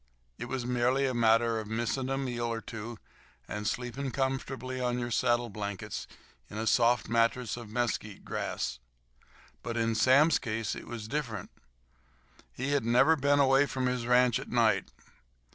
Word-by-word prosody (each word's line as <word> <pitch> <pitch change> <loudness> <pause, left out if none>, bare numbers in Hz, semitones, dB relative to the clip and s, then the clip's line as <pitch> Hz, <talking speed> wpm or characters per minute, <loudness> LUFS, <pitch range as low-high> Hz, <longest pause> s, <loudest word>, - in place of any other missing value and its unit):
It - - -4
was 130 -2 -3
merely 125 +2 +2
a 130 - 0
matter 115 -1 +3
of 110 - -6
missing 120 +4 -2
a 135 - 0
meal 120 -3 -2
or 115 - -2
two 115 +1 -7 0.5
and 105 0 -4
sleeping 125 +4 -3
comfortably 130 -1 -2
on 125 -1 0
your 120 -1 -3
saddle 120 0 +1
blankets 100 -2 -5 0.4
on 105 - -7
a 110 - -2
soft 120 +1 +3
mattress 115 +1 +1
of 120 -3 -9
mesquite 110 -3 -2
grass. - - -3 0.8
But 115 0 -4
in 115 0 +1
Sam's 140 +7 +5
case 115 -3 -2
it - - -8
was 115 -2 -6
different. 115 -7 -4 1.0
He 135 +3 -3
had 145 -3 +2
never 120 +8 +5
been 145 -1 +2
away 135 +1 +5
from 130 -2 -2
his 125 -1 -1
ranch 125 -1 +4
at - - -8
night. - - +2
120 Hz, 160 wpm, -30 LUFS, 115-130 Hz, 1.0 s, Sam's